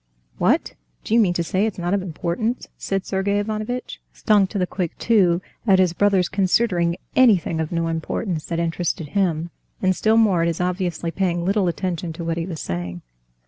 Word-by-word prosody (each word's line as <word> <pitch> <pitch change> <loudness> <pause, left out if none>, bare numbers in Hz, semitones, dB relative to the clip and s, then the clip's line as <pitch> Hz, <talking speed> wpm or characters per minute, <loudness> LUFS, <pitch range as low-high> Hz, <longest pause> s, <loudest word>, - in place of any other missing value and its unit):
"What! - - +2 0.3
do - - -3
you 235 - +6
mean 185 -6 +3
to 170 - 0
say 190 +5 +1
it's 215 - -5
not 175 +1 -1
of 200 - +1
importance?" 185 +7 -2
said 195 -1 -3
Sergey 200 +1 0
Ivanovitch, 215 +4 -3
stung 205 -3 +3
to 205 - -5
the 185 - +1
quick 180 -2 -4
too 185 -6 +3 0.2
at 195 -2 +6
his 185 -2 +3
brother's 195 -1 +3
considering 185 -3 +1 0.2
anything 205 -10 +4
of 160 -1 -2
no 165 -1 0
importance 165 +1 -3
that 170 - -3
interested 165 -2 -2
him, 170 -4 0 0.3
and 185 -1 +2
still 220 +4 +3
more 200 -7 +4
at 165 - +2
his 170 -1 -2
obviously 180 -2 -1
paying 175 -2 -1
little 195 0 +2
attention 175 -1 -2
to 170 - -6
what 165 0 -2
he 170 +1 -2
was 165 -4 -5
saying. 85 0 -5
180 Hz, 190 wpm, -22 LUFS, 170-200 Hz, 0.3 s, you